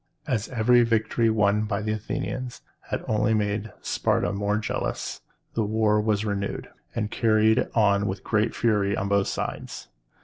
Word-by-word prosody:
As 115 -7 -1
every 120 0 +4
victory 115 0 +2
won 105 -1 +2
by 105 0 -2
the 110 - -1
Athenians 110 +3 -4 0.3
had - - -3
only 105 0 +2
made 105 +1 -1
Sparta - - 0
more 100 +1 0
jealous, 110 - -3 0.3
the 115 - 0
war 105 0 +2
was 105 -1 0
renewed, 100 -1 -3 0.3
and 105 -1 -2
carried 110 -1 +3
on 100 -2 +3
with 95 0 -4
great 110 0 0
fury 105 -3 +1
on 100 - -1
both 100 -1 +2
sides. - - -5
105 Hz, 150 wpm, -25 LUFS, 100-110 Hz, 0.3 s, every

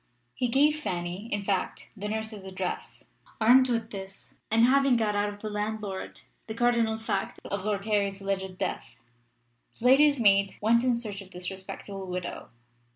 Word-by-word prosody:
He 250 - 0
gave 295 +5 +3
Fanny, 180 -2 -4
in 205 -1 -1
fact, 195 -2 -2
the 210 0 -4
nurse's 220 -1 -4
address. 185 -1 -5 0.4
Armed 250 +3 +6
with 230 -1 -1
this, 195 -1 -8 0.2
and 225 +1 +5
having 270 0 +4
got 215 -2 +1
out 205 0 +1
of 205 0 -10
the 215 - -4
landlord 210 -2 -4 0.3
the 220 - -5
cardinal 235 -2 +2
fact 210 -3 -3
of 200 -1 -3
Lord 205 -2 -1
Harry's 200 -2 +1
alleged 190 -1 -3
death, 120 -8 -4 0.8
the 235 - -7
lady's 285 +2 +6
maid 200 -3 +4
went 230 +3 +3
in 250 -2 +3
search 210 -4 -5
of 190 - -13
this 180 0 -6
respectable 190 0 -7
widow. 180 -1 -5
210 Hz, 165 wpm, -28 LUFS, 195-235 Hz, 0.8 s, Armed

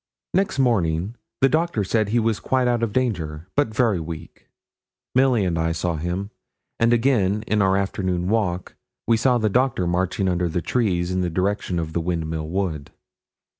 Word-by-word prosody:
Next 195 -4 +1
morning 100 -7 +1 0.3
the 135 - +6
doctor 160 -7 +1
said 110 +2 0
he 115 - +1
was 115 -2 +1
quite 130 -1 +1
out 120 -1 +1
of 115 -2 0
danger, 85 -11 -2
but 145 - +3
very 110 -4 +1
weak. 80 0 -8 0.7
Milly 130 -5 +3
and 85 -3 0
I 80 0 +1
saw 85 +1 -1
him; 90 +6 -3 0.5
and 115 +1 +4
again 110 -4 +2
in 105 0 +1
our 95 0 +3
afternoon 95 -2 -1
walk 95 -4 -1 0.3
we 115 - +4
saw 125 +2 +3
the 110 -2 +1
doctor 120 -3 +1
marching 90 +2 0
under 90 -1 0
the 85 - -1
trees 90 -5 0
in 90 0 0
the 90 - 0
direction 95 +1 -1
of 80 -1 -3
the 85 - 0
Windmill 80 -2 -2
Wood. 85 -6 -2
95 Hz, 175 wpm, -23 LUFS, 85-115 Hz, 0.7 s, the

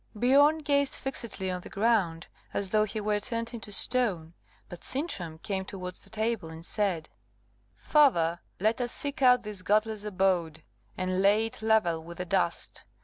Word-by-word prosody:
Biorn 285 +7 +4
gazed 280 -2 +1
fixedly 225 -8 -3
on 180 0 -4
the - - -11
ground, 200 -7 +1 0.3
as 195 -2 0
though 215 0 +3
he 215 +1 -4
were 210 0 0
turned 230 +1 -4
into 225 -2 -7
stone 195 -8 +2 0.3
but 175 - -10
Sintram 200 - -2
came 190 +3 -3
towards 185 -2 -6
the - - -12
table, 220 -5 -2
and 160 +1 -10
said, 190 -7 -1 0.7
"Father, 170 - +3 0.2
let 220 +5 +1
us 245 0 -1
seek 285 -1 -4
out 250 -2 +5
this 210 -3 -6
godless 215 +2 +1
abode, 180 -6 0 0.3
and 185 0 -1
lay 205 +3 +4
it 225 +2 -8
level 215 -7 +2
with 170 +1 -10
the 180 - -4
dust. - - -1
210 Hz, 165 wpm, -28 LUFS, 180-235 Hz, 0.7 s, out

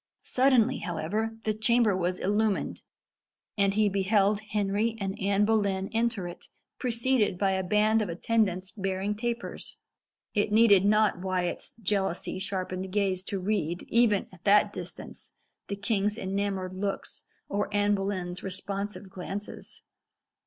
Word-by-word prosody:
Suddenly, 255 -1 +3
however, 205 +5 -2
the 215 - +1
chamber 220 -1 +3
was 180 0 0
illumined, 205 +1 0 0.7
and 200 -1 +2
he 215 0 +4
beheld 200 +1 +2
Henry 210 +2 0
and 195 -1 -2
Anne 200 +1 +2
Boleyn 200 -3 +1
enter 225 -5 0
it, 175 - -10 0.3
preceded 235 -5 +1
by 195 0 +2
a 190 0 0
band 210 +3 +3
of 205 - -2
attendants 190 0 0
bearing 195 0 -2
tapers. 235 +2 -4 0.6
It 205 -1 +1
needed 210 -3 +6
not 215 -2 +3
Wyat's 185 -2 -2
jealousy 195 -3 -1
sharpened 185 -1 -3
gaze 190 -2 0
to 200 - -3
read, 180 -3 -1
even 230 -4 +3
at 185 -1 -17
that 205 0 +5
distance, 180 -1 -8 0.3
the 200 - -3
king's 210 0 0
enamoured 195 -2 -2
looks, 195 +1 -4 0.2
or 205 0 -2
Anne 205 0 +2
Boleyn's 185 -3 -2
responsive 200 +1 -4
glances. 195 +2 -7
200 Hz, 130 wpm, -28 LUFS, 190-215 Hz, 0.7 s, needed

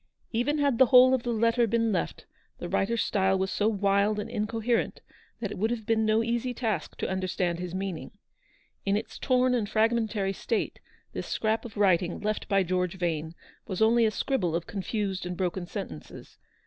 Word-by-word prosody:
Even 245 +6 0
had 280 -5 +1
the 260 - +7
whole 255 +1 +7
of 260 - +2
the 240 - -2
letter 230 +1 +2
been 230 0 +1
left, 195 - -2 0.3
the - - -5
writer's 230 +4 +1
style 190 -1 +2
was 190 0 -1
so 210 - +1
wild 200 0 +2
and 210 - -4
incoherent 225 +2 -1 0.4
that 210 -4 -3
it 210 - -6
would 220 +3 +1
have 230 -2 -3
been 220 -1 +2
no 220 +1 +3
easy 235 +2 -1
task 215 -10 -2
to - - -2
understand 185 -2 -1
his 180 0 -5
meaning. 190 -3 -4 0.7
In 200 +1 +1
its - - -6
torn 255 -1 +2
and 220 -5 0
fragmentary 220 -3 +1
state, 225 +3 -2 0.3
this - - -5
scrap 220 +1 0
of 220 -3 -9
writing 180 -4 +2
left 215 0 -2
by 195 -2 +3
George 180 0 -1
Vane 165 -2 -2 0.3
was 190 -4 -4
only 225 +1 +4
a - - +3
scribble 205 - -1
of 170 0 -2
confused 195 -1 -3
and 180 0 -5
broken 180 -1 -2
sentences. 80 - -8
210 Hz, 185 wpm, -28 LUFS, 190-230 Hz, 0.7 s, the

